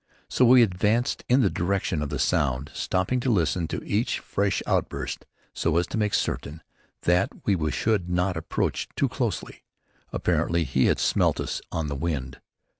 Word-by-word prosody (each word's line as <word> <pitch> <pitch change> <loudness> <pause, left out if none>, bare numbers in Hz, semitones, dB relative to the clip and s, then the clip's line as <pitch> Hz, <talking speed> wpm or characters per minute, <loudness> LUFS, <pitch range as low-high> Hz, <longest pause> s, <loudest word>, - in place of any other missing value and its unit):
So 125 - +3
we 125 0 +7
advanced 110 +6 +1
in 130 +2 +5
the 100 - +3
direction 90 -3 -1
of 75 - -2
the 75 - -3
sound, 70 0 0
stopping 95 +7 0
to 125 - -1
listen 85 -5 +1
to - - -4
each 105 +4 0
fresh 100 0 -1
outburst - - -2 0.3
so 80 0 0
as 85 - +2
to - - 0
make 105 -2 +1
certain 80 +3 -2 0.4
that 90 +2 +3 0.2
we 80 -7 +1
should 100 -3 0
not 90 +1 0
approach 80 - -2
too - - +2
closely. - - -3 0.5
Apparently 85 0 +1
he 65 -3 +1
had - - +3
smelt - - +2
us - - -3
on 80 - -2
the 70 -1 -3
wind. 70 -4 -3
90 Hz, 170 wpm, -26 LUFS, 75-105 Hz, 0.5 s, we